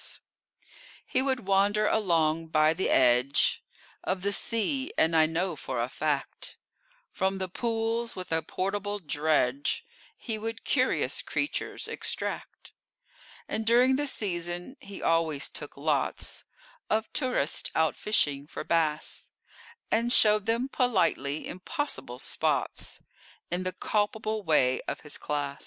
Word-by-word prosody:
He 260 - +1
would 260 -5 -1
wander 200 +2 +3
along 165 -6 +2
by 155 0 +4
the 185 +4 -1
edge 125 +1 +4 0.4
Of 185 0 -2
the 200 0 +1
sea, 250 +7 0
and 165 +1 +3
I 160 -1 +6
know 170 +2 -1
for 130 -3 -4
a 120 +1 0
fact 145 -1 -2 0.5
From 190 0 0
the 190 -1 -2
pools 230 +3 -1
with 185 -2 -7
a 160 0 +2
portable 205 +5 -2
dredge 145 - 0 0.3
He 220 -3 -4
would 225 +1 -5
curious 255 -2 +1
creatures 290 - -2
extract: - - -4 0.8
And, 220 - -2
during 245 +3 +5
the 290 +2 0
season, 175 0 -3
he 200 -1 -9
always 165 -3 +2
took - - -7
lots - - -1 0.4
Of 220 +1 0
tourists 250 - +1
out 160 -1 +2
fishing 145 -9 0
for - - -6
bass, 155 -2 0 0.6
And 235 +2 +2
showed 210 -3 +5
them 235 +3 +1
politely 175 - +1
impossible 185 - -4
spots, - - -1 0.5
In 175 +1 0
the 185 0 -2
culpable 215 +2 -1
way 140 -8 +3
of - - -3
his 150 -1 -6
class. 145 -2 -2
185 Hz, 130 wpm, -28 LUFS, 155-225 Hz, 0.8 s, I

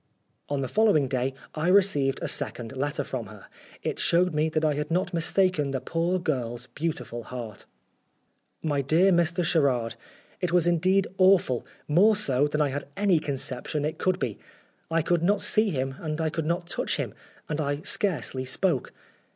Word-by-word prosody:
On 145 -1 -1
the 135 - -2
following 205 - +3
day 130 +1 -1 0.2
I 155 +2 -2
received 180 -9 +3
a - - -1
second 130 -4 -2
letter 145 +2 -1
from 125 -5 -5
her. 105 -1 -13 0.4
It - - -3
showed 180 0 +2
me 155 +1 +1
that 155 0 0
I 150 - +2
had 150 +1 -3
not 180 +3 0
mistaken 170 -2 +2
the 135 -1 -2
poor 165 +7 -1
girl's 125 -8 -2
beautiful 130 -7 -4
heart. 120 -4 -8 1.0
"My 145 -3 0
DEAR 165 +8 +3
MR. 175 0 +2
SHERARD, 130 -9 +1 0.5
It 180 -2 0
was 175 -2 +4
indeed 185 +3 +3
awful, 185 -10 +4 0.2
more 195 +8 +5
so 145 -8 +2
than 150 +1 -1
I 145 - +2
had 140 +2 -5
any 195 -5 +3
conception 140 0 -3
it 155 - -3
could 185 -1 +1
be. 115 - -3 0.5
I 165 0 +1
could 175 0 +1
not 200 +4 +2
see 215 0 +3
him 135 -5 -2
and 155 -1 -4
I 160 -1 0
could 160 -1 -3
not 170 +1 -1
touch - - -2
him, - - -3 0.3
and 150 +1 -2
I 145 0 -2
scarcely 155 - -1
spoke. 135 +2 0
155 Hz, 175 wpm, -26 LUFS, 135-175 Hz, 1.0 s, more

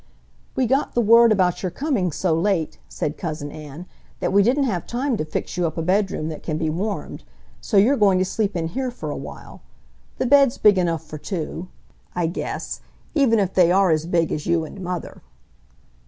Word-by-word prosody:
"We 260 - +2
got 270 +4 0
the - - +3
word 230 +1 +6
about 185 -4 +2
your 185 - -1
coming 220 - -1
so 165 +3 0
late," 165 -1 0
said 150 - -4
Cousin 150 -3 -4
Ann, 155 +3 -9 0.3
"that - - -1
we 200 - +6
didn't 255 +7 +2
have 195 -10 -2
time 255 +2 -1
to - - -1
fix 155 - -4
you 175 -1 +2
up 160 - -6
a 165 - -1
bedroom 185 -3 0
that 155 - -7
can 155 -2 -3
be 155 -1 -1
warmed. 195 +1 -4 0.4
So - - 0
you're 230 +8 +5
going 200 -3 +4
to 185 - +2
sleep 205 +1 -1
in 165 -1 -1
here 260 +7 -2
for 245 - -6
a - - -4
while. - - -9 0.6
The - - 0
bed's 275 -1 +5
big 205 -3 +5
enough 165 -3 -1
for 155 0 -8
two, 175 0 -5 0.5
I 175 -1 0
guess, 165 - -4 0.3
even 270 -7 +3
if 195 -3 0
they 175 -2 +4
are 190 -1 +4
as 155 +1 0
big 170 -2 +1
as 150 - -3
you 170 -2 +1
and 190 - -10
Mother." 180 -2 -5
185 Hz, 205 wpm, -22 LUFS, 165-220 Hz, 0.6 s, word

